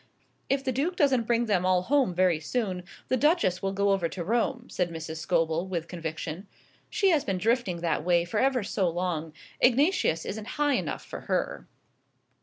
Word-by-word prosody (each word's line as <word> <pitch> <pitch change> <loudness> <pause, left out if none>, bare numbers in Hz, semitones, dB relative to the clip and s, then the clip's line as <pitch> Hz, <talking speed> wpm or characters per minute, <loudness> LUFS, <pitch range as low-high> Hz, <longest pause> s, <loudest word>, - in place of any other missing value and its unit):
"If 275 0 +1
the 265 - 0
Duke 295 +8 -1
doesn't 270 -9 +2
bring 235 0 +2
them 200 -5 +1
all 185 -1 +3
home 260 -6 +2
very 180 -3 +3
soon 185 +1 -2 0.2
the 255 - +1
Duchess 295 - +2
will 195 - -1
go 200 +1 +1
over 185 -4 +1
to 175 - -5
Rome," 240 - 0
said 180 -1 -1
Mrs. 160 -1 -6
Scobel, 165 +1 0
with 170 -3 -3
conviction. 165 +2 -5 0.4
"She 390 - +2
has 310 -4 +3
been 195 - -1
drifting 220 -4 0
that 165 -3 0
way 170 0 +3
for 195 +5 -2
ever 260 -3 +2
so 195 -2 0
long. 165 -2 -2 0.3
Ignatius 260 - +3
isn't 210 +1 -5
high 295 -1 +2
enough 250 - -2
for - - -7
her." - - -1
195 Hz, 185 wpm, -27 LUFS, 170-250 Hz, 0.4 s, all